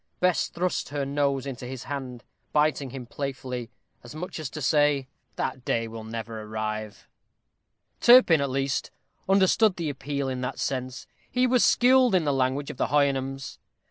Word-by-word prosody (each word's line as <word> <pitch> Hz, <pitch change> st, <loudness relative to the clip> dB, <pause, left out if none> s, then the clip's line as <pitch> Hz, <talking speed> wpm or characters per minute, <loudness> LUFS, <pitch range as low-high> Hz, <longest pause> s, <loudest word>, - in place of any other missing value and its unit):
Bess 180 Hz, -1 st, +2 dB
thrust 180 Hz, +1 st, -2 dB
her 140 Hz, -1 st, -2 dB
nose 140 Hz, -1 st, 0 dB
into 130 Hz, -2 st, -6 dB
his 130 Hz, 0 st, -6 dB
hand, 130 Hz, -4 st, -6 dB, 0.3 s
biting 150 Hz, -2 st, +2 dB
him 130 Hz, -1 st, -7 dB
playfully, 125 Hz, -2 st, -5 dB, 0.3 s
as 120 Hz, +4 st, -11 dB
much 180 Hz, +2 st, -6 dB
as 155 Hz, -4 st, -4 dB
to 155 Hz, -, -7 dB
say, 145 Hz, -1 st, +2 dB, 0.3 s
"That 130 Hz, -, -3 dB
day 115 Hz, -2 st, 0 dB
will 115 Hz, 0 st, -8 dB
never 110 Hz, 0 st, -6 dB
arrive." 110 Hz, -1 st, -5 dB, 0.9 s
Turpin, 240 Hz, -, +7 dB
at 140 Hz, -, 0 dB
least, 135 Hz, +1 st, -1 dB, 0.4 s
understood 195 Hz, +1 st, +4 dB
the 165 Hz, -4 st, -2 dB
appeal 140 Hz, 0 st, -3 dB
in 130 Hz, -1 st, -3 dB
that 125 Hz, -, -3 dB
sense; 130 Hz, 0 st, -3 dB, 0.2 s
he 250 Hz, +1 st, +2 dB
was 250 Hz, -1 st, +3 dB
skilled 250 Hz, -3 st, +5 dB
in 180 Hz, -, +3 dB
the 145 Hz, -2 st, +1 dB
language 135 Hz, +2 st, 0 dB
of -, -, -12 dB
the -, -, 0 dB
Houyhnhnms. 135 Hz, -1 st, 0 dB
135 Hz, 165 wpm, -26 LUFS, 125-155 Hz, 0.9 s, Turpin